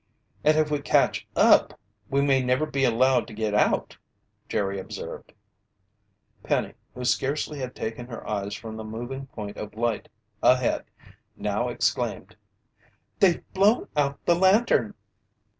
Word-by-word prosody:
"And 155 +1 +4
if 155 -1 +2
we 145 -1 0
catch - - +2
up, - - +5 0.3
we 140 +1 +2
may 135 -2 +3
never 125 +4 +1
be 135 -3 0
allowed 125 -1 +3
to 110 - -10
get 110 -1 -1
out!" 105 - +1 0.5
Jerry 100 -1 -1
observed. 95 - -8 1.1
Penny, - - -1 0.2
who 125 - -5
scarcely 140 +4 0
had 130 -1 -5
taken 115 +2 -5
her 115 -2 -8
eyes 100 -1 -2
from 110 0 -8
the 110 - -6
moving 120 +5 -6
point 105 -5 -8
of 105 0 -7
light 115 -1 -1 0.3
ahead, 125 -1 +3 0.5
now - - -1
exclaimed: - - -2 0.8
"They've 185 -4 +4
blown 205 +5 +3
out 140 -1 +1
the 175 - +5
lantern!" 190 - +3
125 Hz, 140 wpm, -26 LUFS, 110-145 Hz, 1.1 s, up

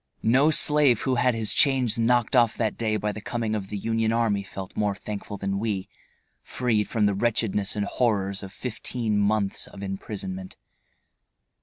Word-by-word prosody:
No 130 +7 +4
slave 150 -6 +4
who 130 - 0
had 125 -1 +2
his 110 -2 +2
chains 130 -5 +3
knocked 120 +2 +2
off 120 -2 +4
that 110 -3 0
day 110 -2 0
by 105 0 -2
the 110 - -8
coming 115 0 -2
of 100 -3 -3
the 105 - -4
Union 115 +2 0
army 115 -3 +1
felt 95 0 -8
more 105 -2 0
thankful 100 0 -6
than 100 0 -2
we, 105 -4 -2 0.5
freed 115 -5 -1
from 110 -2 +1
the 100 - +2
wretchedness 105 -1 0
and 105 -1 -1
horrors 100 -5 0
of 95 -1 -8
fifteen 115 -1 -3
months 100 -1 0
of 100 - -10
imprisonment. 95 -1 -6
110 Hz, 170 wpm, -25 LUFS, 100-120 Hz, 0.5 s, No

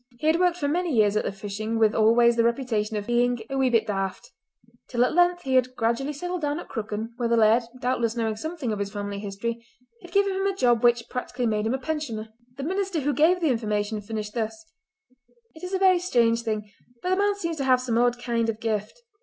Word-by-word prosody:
He 275 - -6
had 320 +2 +3
worked 360 -1 +2
for 285 - -1
many 345 +3 0
years 215 -5 +3
at 215 - +1
the - - -1
fishing 210 +3 -4
with 220 -1 +3
always 235 +2 +4
the 230 - +3
reputation 230 -3 0
of 205 - -4
being 245 +1 +2
"a - - -2
wee 260 -1 +3
bit 230 -2 +2
daft," 195 -3 -3 0.6
till 245 -1 +2
at - - -1
length 350 +1 +3
he 265 - -2
had 255 0 +2
gradually 235 +5 0
settled 355 +4 -4
down 295 +1 -1
at - - -9
Crooken, 220 0 -4
where 240 -2 -1
the 235 - +3
laird, 225 +2 +5 0.2
doubtless 240 -2 0
knowing 225 -2 -1
something 315 0 -4
of 210 - -3
his 200 0 -3
family 205 -1 -4
history, 215 +4 -4 0.4
had 350 -2 -13
given 400 +1 +2
him 385 +1 0
a 390 - -1
job 240 - +3
which 240 -1 +4
practically 250 0 -3
made 215 -1 0
him 240 - +1
a - - -1
pensioner. 255 -6 -4 0.3
The 275 - -5
minister 375 0 -1
who 290 +1 0
gave 345 +5 +3
the 320 -5 +3
information 210 -2 -1
finished 210 0 -5
thus:— 240 +9 -4 0.9
"It 315 - -14
is 360 - -5
a 385 - +1
very 375 -2 +4
strange 235 -10 +2
thing, 215 -2 -3 0.3
but 365 - -1
the - - +4
man 405 +1 +2
seems 335 -5 -3
to 275 - -2
have 255 -1 +4
some 240 -2 0
odd 245 0 +2
kind 235 -2 -1
of 220 -1 -3
gift. 225 - -3
240 Hz, 235 wpm, -25 LUFS, 220-310 Hz, 0.9 s, laird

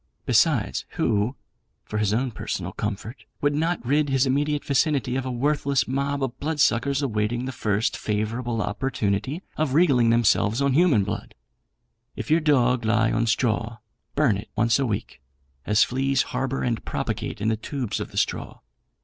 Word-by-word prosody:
Besides, - - +2
who 110 +4 +1 0.5
(for 105 - -3
his 105 -2 +1
own 125 +4 0
personal - - -4
comfort), 110 +4 -5
would 145 0 +1
not 165 0 -1
rid 145 +3 +2
his 135 0 +3
immediate 145 +2 0
vicinity 140 -2 +1
of 130 0 -2
a - - -2
worthless 140 +1 +1
mob 140 +1 -1
of 130 -1 -4
blood 155 +1 -2
suckers 140 +2 +2
awaiting 120 0 -1
the 130 - -3
first 105 -3 0
favourable 110 +2 -2
opportunity 130 - -2
of 150 -3 0
regaling 135 -9 +4
themselves 115 -1 +3
on 140 -1 +2
human 150 - +4
blood? 100 0 -5 0.8
If - - -5
your 160 - +5
dog 125 -6 +2
lie 110 0 +2
on 115 +1 +1
straw, 115 0 0 0.4
burn 140 -9 +3
it 105 - -9
once 115 +3 +3
a 135 - +1
week, 100 - -4 0.5
as 105 0 +5
fleas 135 +1 +1
harbour 130 +1 -1
and 115 -3 -1
propagate - - -3
in 110 +2 0
the 110 - +2
tubes 120 +1 -4
of - - -5
the - - -10
straw. - - -2
125 Hz, 165 wpm, -24 LUFS, 110-140 Hz, 0.8 s, your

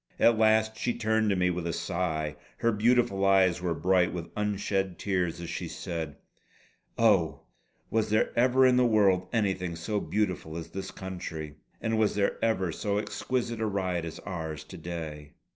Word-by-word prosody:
At 115 - +6
last 110 0 +3
she 120 +2 -1
turned 110 0 +1
to 100 - +2
me 90 -1 +2
with 85 -1 -3
a - - 0
sigh; 85 -3 -2 0.2
her 115 - +2
beautiful 110 -2 +2
eyes 95 -3 +4
were 85 -2 -1
bright 90 +1 +3
with 85 -2 -6
unshed 100 -3 -1
tears 90 -3 -1
as 85 - -6
she - - -4
said: 80 -4 -5 0.8
"Oh, - - +3 0.5
was 110 -1 +1
there 110 +1 +2
ever 130 +2 +4
in 125 -1 +5
the 125 - +5
world 100 -5 +3
anything 95 -6 0
so 100 +6 -2
beautiful 90 -7 -2
as 85 - -6
this 95 0 -5
Country! 90 -6 -6 0.2
And 110 -1 0
was 110 -2 +2
there 100 -1 0
ever 95 -6 +1
so 100 +4 -1
exquisite 115 +2 -2
a 110 - +1
ride 95 -4 -1
as 85 -1 -6
ours 80 -5 -5
to 95 - -11
day!" 80 -3 -6
95 Hz, 175 wpm, -28 LUFS, 85-110 Hz, 0.8 s, At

